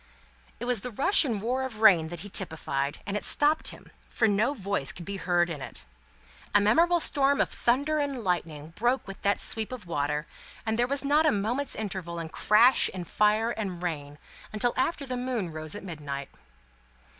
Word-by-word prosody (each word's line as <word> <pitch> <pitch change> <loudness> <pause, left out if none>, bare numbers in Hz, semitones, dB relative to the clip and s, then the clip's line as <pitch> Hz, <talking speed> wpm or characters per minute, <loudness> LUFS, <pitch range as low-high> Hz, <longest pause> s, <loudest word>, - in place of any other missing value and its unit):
It - - -4
was 245 -4 0
the 250 - -5
rush 275 - +4
and 225 -8 -2
roar 250 +3 -1
of 245 -5 -5
rain 180 -8 +6
that 175 -1 -7
he 205 - -8
typified, 145 -7 -2
and 200 -1 -3
it 210 - -2
stopped 300 +2 +3
him, - - -7 0.2
for 225 - +1
no 220 +7 +1
voice 200 - 0
could 175 - -10
be 200 0 -5
heard 175 -2 +1
in 160 -5 -6
it. - - -9 0.7
A - - +8
memorable 335 +12 +3
storm 280 -2 +4
of - - +2
thunder 285 +6 +1
and 280 -5 -2
lightning 160 -5 -2
broke 240 +8 0
with 195 -1 -9
that 200 0 +1
sweep 220 +1 -2
of 250 -6 -7
water, 150 -2 -2 0.4
and 220 +1 -1
there 245 - +3
was 280 +1 -2
not 300 +3 +3
a - - +5
moment's 230 +7 -1
interval 190 -5 -5
in 165 -1 -5
crash, 235 +9 +4
and 175 -2 -6
fire, 215 +2 +2
and 190 -6 -5
rain, 145 -4 -4 0.3
until 225 +3 +2
after 280 +2 -1
the 255 -1 -4
moon 245 -8 -3
rose 155 +2 -5
at 205 - -8
midnight. 145 -6 -6
210 Hz, 195 wpm, -27 LUFS, 175-250 Hz, 0.7 s, A